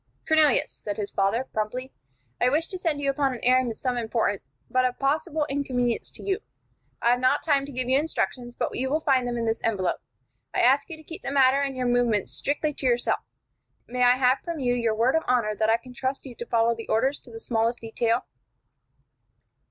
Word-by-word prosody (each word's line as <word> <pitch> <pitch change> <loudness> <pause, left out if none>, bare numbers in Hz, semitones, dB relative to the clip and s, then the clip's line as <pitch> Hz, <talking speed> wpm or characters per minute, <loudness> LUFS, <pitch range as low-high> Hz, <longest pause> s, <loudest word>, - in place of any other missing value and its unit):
"Cornelius," 315 -2 +4
said 205 -2 -6
his 205 -2 -4
father, 200 +5 +1
promptly, 245 +5 -3 0.5
"I 250 - +5
wish 310 +5 +1
to 370 - -5
send 320 -5 -1
you 275 -1 +2
upon 275 -2 0
an - - -8
errand 255 -1 +3
of 220 - -9
some 250 -2 -1
importance, 220 -3 0 0.3
but 255 0 +2
of 250 -1 0
possible 295 +2 0
inconvenience 255 -4 -1
to - - -6
you. 385 -1 0 0.6
I 235 - +5
have 245 - +2
not 255 0 +2
time 280 -3 +2
to - - -8
give 255 -1 -3
you 260 +2 +4
instructions, 250 -5 -2
but - - -2
you 265 +1 -1
will 305 +3 +1
find 265 -5 +2
them 240 0 -2
in 230 - -1
this 225 0 -1
envelope. 200 -5 0 0.5
I - - +3
ask 270 +6 +4
you 325 - -7
to 315 - -15
keep 325 +2 -9
the - - -4
matter 275 0 +4
and 275 -2 -2
your 255 - -1
movements 240 -4 +1
strictly 295 +1 0
to 275 - -6
yourself. 240 -1 +1 0.7
May 250 +1 -4
I 245 0 +6
have 255 0 +3
from 335 -2 -5
you 245 -2 +1
your 235 -3 0
word 240 +6 +2
of 320 - +3
honor 240 -4 +2
that 215 +1 0
I 225 - +4
can 250 +2 -13
trust 260 +3 -3
you 260 - -8
to 235 0 -7
follow 230 0 +3
the 230 0 -8
orders 265 +6 +1
to - - -16
the 450 - -8
smallest 230 - 0
detail?" 230 +1 0
250 Hz, 220 wpm, -26 LUFS, 235-275 Hz, 0.7 s, I